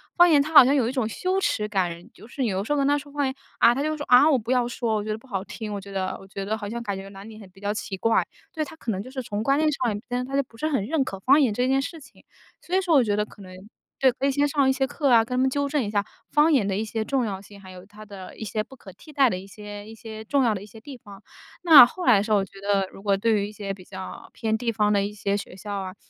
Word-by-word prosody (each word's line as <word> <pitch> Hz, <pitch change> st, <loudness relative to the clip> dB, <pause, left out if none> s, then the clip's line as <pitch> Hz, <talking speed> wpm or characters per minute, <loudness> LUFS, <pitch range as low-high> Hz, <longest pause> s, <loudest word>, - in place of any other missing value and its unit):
方 350 Hz, 0 st, +6 dB
言 295 Hz, -3 st, +5 dB
他 310 Hz, +3 st, -4 dB
好 290 Hz, -, +11 dB
像 270 Hz, -, +3 dB
有 250 Hz, -5 st, +2 dB
一 -, -, -1 dB
种 255 Hz, -5 st, -1 dB
羞 370 Hz, -, -1 dB
耻 210 Hz, -, 0 dB
感， 185 Hz, -1 st, -2 dB
就 -, -, -15 dB
是 270 Hz, -, -7 dB
你 240 Hz, -, +1 dB
有 195 Hz, -1 st, -1 dB
时 225 Hz, -, -6 dB
候 295 Hz, -, +2 dB
跟 275 Hz, 0 st, +2 dB
他 290 Hz, 0 st, +3 dB
说 285 Hz, 0 st, -9 dB
方 290 Hz, -1 st, -1 dB
言， 265 Hz, -, -1 dB, 0.3 s
啊， 235 Hz, -, +6 dB
他 270 Hz, -, -2 dB
就 310 Hz, 0 st, -1 dB
说：” 290 Hz, -, -5 dB
啊， 255 Hz, +5 st, +7 dB
我 280 Hz, -, +4 dB
不 230 Hz, +1 st, -4 dB
要 250 Hz, -2 st, +2 dB
说， 235 Hz, -2 st, -2 dB
我 210 Hz, -, -1 dB
觉 215 Hz, -, -7 dB
得 215 Hz, -, -2 dB
不 225 Hz, -, -19 dB
好 195 Hz, -6 st, -3 dB
听， 210 Hz, +1 st, -7 dB
我 200 Hz, -, -4 dB
觉 200 Hz, +1 st, -12 dB
得 190 Hz, -1 st, -2 dB
我 195 Hz, -, -14 dB
觉 195 Hz, 0 st, -6 dB
得 215 Hz, +2 st, -1 dB
好 205 Hz, -2 st, -6 dB
像 235 Hz, +2 st, -5 dB
感 200 Hz, -3 st, -3 dB
觉 195 Hz, -, -8 dB
哪 195 Hz, 0 st, -11 dB
里 220 Hz, 0 st, -11 dB
很 200 Hz, -3 st, -13 dB
比 195 Hz, +1 st, -20 dB
较 205 Hz, +1 st, -2 dB
奇 200 Hz, -2 st, -5 dB
怪。 225 Hz, +4 st, +2 dB, 0.3 s
“对， 310 Hz, -, -2 dB
他 305 Hz, -, -9 dB
可 235 Hz, -7 st, -4 dB
能 190 Hz, -2 st, -3 dB
就 255 Hz, -, -10 dB
是 260 Hz, 0 st, -5 dB
从 205 Hz, -1 st, -4 dB
观 275 Hz, +5 st, +2 dB
念 310 Hz, +1 st, +2 dB
上 235 Hz, -7 st, -1 dB
根 250 Hz, +1 st, -1 dB
他 270 Hz, +2 st, -5 dB
就 280 Hz, -, +2 dB
不 235 Hz, -, -22 dB
是 310 Hz, -, -1 dB
很 270 Hz, -10 st, 0 dB
认 305 Hz, +1 st, 0 dB
可 195 Hz, -7 st, -6 dB
方 275 Hz, +9 st, +4 dB
言 255 Hz, -6 st, +3 dB
这 245 Hz, +4 st, 0 dB
件 270 Hz, +1 st, +2 dB
事 325 Hz, +4 st, -6 dB
情。 285 Hz, -, -18 dB, 0.4 s
所 360 Hz, -, -3 dB
以 380 Hz, -, +3 dB
说 355 Hz, -3 st, 0 dB
我 270 Hz, -, +6 dB
觉 205 Hz, -3 st, 0 dB
得 210 Hz, 0 st, 0 dB
可 210 Hz, -, -16 dB
能， 185 Hz, -1 st, -11 dB, 0.5 s
对， 265 Hz, -1 st, +5 dB
可 265 Hz, +3 st, -2 dB
以 -, -, +3 dB
先 285 Hz, +2 st, +1 dB
上 280 Hz, -2 st, +2 dB
一 -, -, +5 dB
些 265 Hz, 0 st, 0 dB
课 280 Hz, +1 st, -1 dB
啊， 230 Hz, -2 st, +5 dB
跟 250 Hz, +2 st, -4 dB
他 255 Hz, -, +2 dB
们 265 Hz, -, +3 dB
纠 285 Hz, +1 st, -1 dB
正 285 Hz, -1 st, 0 dB
一 205 Hz, -, -4 dB
下 205 Hz, -1 st, 0 dB, 0.3 s
方 305 Hz, +2 st, +4 dB
言 235 Hz, -8 st, +2 dB
的 195 Hz, -1 st, -1 dB
一 220 Hz, -, -2 dB
些 220 Hz, 0 st, -3 dB
重 255 Hz, +2 st, 0 dB
要 195 Hz, -3 st, -4 dB
性， 200 Hz, 0 st, -15 dB
还 190 Hz, -1 st, -13 dB
有 180 Hz, -1 st, -11 dB
它 210 Hz, +1 st, -13 dB
的 195 Hz, -3 st, -11 dB
一 -, -, -7 dB
些 215 Hz, +1 st, -2 dB
不 265 Hz, -, -15 dB
可 205 Hz, -6 st, -13 dB
替 305 Hz, -, -15 dB
代 270 Hz, -4 st, +3 dB
的 180 Hz, -, -2 dB
一 195 Hz, -, -12 dB
些 205 Hz, 0 st, -10 dB
一 225 Hz, -, -10 dB
些 220 Hz, -1 st, -9 dB
重 275 Hz, +4 st, +1 dB
要 230 Hz, -3 st, +2 dB
的 195 Hz, -, -5 dB
一 -, -, -10 dB
些 220 Hz, +2 st, -14 dB
地 270 Hz, +5 st, -10 dB
方。 205 Hz, -5 st, -14 dB, 0.4 s
那 305 Hz, -8 st, +10 dB
后 365 Hz, -, -7 dB
来 245 Hz, -5 st, +6 dB
的 200 Hz, -, +1 dB
时 220 Hz, -, -5 dB
候 210 Hz, -, +5 dB
我 195 Hz, -, 0 dB
觉 195 Hz, 0 st, -15 dB
得 200 Hz, -1 st, +1 dB
如 -, -, -13 dB
果 200 Hz, -1 st, +1 dB
对 225 Hz, +3 st, +1 dB
于 200 Hz, -, -2 dB
一 -, -, -9 dB
些 200 Hz, -2 st, -5 dB
比 190 Hz, -, -13 dB
较 190 Hz, 0 st, -9 dB
偏 220 Hz, -2 st, -2 dB
地 230 Hz, +1 st, -1 dB
方 210 Hz, -1 st, +1 dB
的 200 Hz, -1 st, +2 dB
一 205 Hz, -, -3 dB
些 200 Hz, -1 st, -2 dB
学 200 Hz, -, -6 dB
校 205 Hz, +2 st, -7 dB
啊， 190 Hz, -1 st, -5 dB
220 Hz, 365 characters per minute, -24 LUFS, 200-270 Hz, 0.5 s, 好